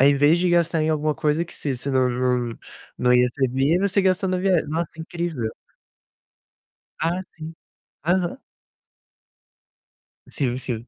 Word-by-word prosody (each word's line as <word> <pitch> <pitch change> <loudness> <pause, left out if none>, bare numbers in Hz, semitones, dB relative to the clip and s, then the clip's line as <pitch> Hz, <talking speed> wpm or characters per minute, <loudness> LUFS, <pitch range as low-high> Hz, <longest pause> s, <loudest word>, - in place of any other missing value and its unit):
Ao 135 - +7
invés 145 +4 +5
de 180 +1 +1
gastar 170 -2 +2
em 155 - +1
alguma 155 -1 0
coisa 150 +2 0
que 175 - -14
você 140 -3 -3
você 130 +3 -4
não 130 -1 +3
não 125 -1 -1 0.4
não 125 0 +2
ia 125 0 +5
receber, 135 +4 +2
você 200 0 +2
gastou 190 0 +1
na 185 0 0
via 185 -3 +2
nossa, 165 +2 -1
incrível. 160 -8 -3 1.5
Ah, 170 +3 0
sim. 160 0 -8 0.5
Aham. 180 +6 +1 1.9
Sim, 125 -3 -1
sim. 120 -2 -5
155 Hz, 145 wpm, -23 LUFS, 130-175 Hz, 1.9 s, Ao